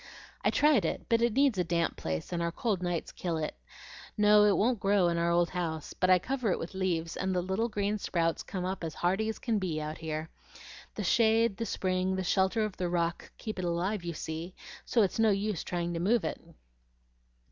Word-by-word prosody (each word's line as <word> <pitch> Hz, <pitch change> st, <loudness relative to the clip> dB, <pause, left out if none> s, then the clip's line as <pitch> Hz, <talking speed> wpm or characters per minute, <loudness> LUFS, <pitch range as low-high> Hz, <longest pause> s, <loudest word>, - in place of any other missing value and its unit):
"I -, -, +4 dB
tried 290 Hz, -, +4 dB
it, 160 Hz, -, -2 dB
but 230 Hz, 0 st, +3 dB
it 235 Hz, -2 st, +2 dB
needs 270 Hz, -5 st, +3 dB
a -, -, +3 dB
damp 170 Hz, 0 st, 0 dB
place, 80 Hz, -, -4 dB
and 170 Hz, -, -1 dB
our 170 Hz, 0 st, 0 dB
cold 200 Hz, 0 st, -1 dB
nights 175 Hz, -2 st, -2 dB
kill 170 Hz, -3 st, -3 dB
it. 155 Hz, -1 st, -3 dB, 0.6 s
No, 210 Hz, 0 st, +6 dB
it 205 Hz, -, +4 dB
won't 235 Hz, +1 st, +2 dB
grow 195 Hz, -3 st, +3 dB
in 170 Hz, 0 st, 0 dB
our 170 Hz, 0 st, +1 dB
old 170 Hz, 0 st, +2 dB
house; 160 Hz, -4 st, -3 dB
but 185 Hz, -, 0 dB
I 185 Hz, -, +7 dB
cover 250 Hz, +4 st, -2 dB
it -, -, +1 dB
with 165 Hz, -, -6 dB
leaves, 175 Hz, -3 st, -1 dB
and 190 Hz, 0 st, -1 dB
the 180 Hz, -, +2 dB
little 190 Hz, +6 st, -1 dB
green 210 Hz, 0 st, -1 dB
sprouts 165 Hz, -3 st, 0 dB
come 180 Hz, -2 st, -4 dB
up 190 Hz, -1 st, -3 dB
as 160 Hz, -2 st, -4 dB
hearty 195 Hz, +5 st, 0 dB
as 220 Hz, -, -3 dB
can 225 Hz, -4 st, -1 dB
be 170 Hz, -5 st, -2 dB
out 155 Hz, 0 st, -5 dB
here. 160 Hz, 0 st, -4 dB, 0.6 s
The -, -, -3 dB
shade, 225 Hz, -2 st, +3 dB
the 230 Hz, -, -3 dB
spring, 185 Hz, 0 st, 0 dB
the 190 Hz, -, -2 dB
shelter 190 Hz, +4 st, +2 dB
of 210 Hz, -, -6 dB
the 180 Hz, -1 st, -1 dB
rock, 170 Hz, -1 st, -1 dB
keep 215 Hz, -3 st, -5 dB
it 180 Hz, -, -2 dB
alive, 175 Hz, +3 st, -1 dB
you 170 Hz, -1 st, -3 dB
see, 160 Hz, +3 st, -6 dB, 0.3 s
so 230 Hz, -, +3 dB
it's 195 Hz, -, -1 dB
no 225 Hz, -1 st, +5 dB
use 200 Hz, -2 st, 0 dB
trying 175 Hz, -1 st, -2 dB
to 165 Hz, -, -2 dB
move 210 Hz, +5 st, +2 dB
it." -, -, -3 dB
185 Hz, 225 wpm, -30 LUFS, 170-210 Hz, 0.6 s, I